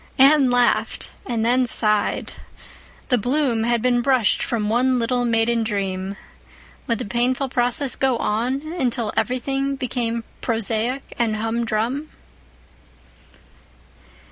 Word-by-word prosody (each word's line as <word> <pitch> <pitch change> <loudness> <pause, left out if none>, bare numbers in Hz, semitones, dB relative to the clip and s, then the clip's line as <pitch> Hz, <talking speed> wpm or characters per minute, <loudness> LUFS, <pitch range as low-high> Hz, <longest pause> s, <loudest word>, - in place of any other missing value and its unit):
Anne 275 0 +6
laughed—and 240 -1 0
then 250 +1 +3
sighed. 215 -3 +1 0.8
The 250 -3 +3
bloom 245 -1 0
had 235 -1 +1
been 245 -1 +3
brushed 250 -5 +2
from 220 -3 -1
one 250 +4 +2
little 245 +1 0
maiden 230 0 +2
dream. 195 -2 -3 0.7
Would 230 - +1
the 250 - -4
painful 250 +5 0
process 250 +2 0
go 265 -3 +1
on 240 +6 -1 0.2
until 240 -3 -1
everything 270 +2 -1
became 235 -3 -2 0.2
prosaic 230 +3 -1
and 225 -2 +1
hum 225 +2 -1
drum? 240 +8 -2
240 Hz, 115 wpm, -22 LUFS, 225-255 Hz, 0.8 s, Anne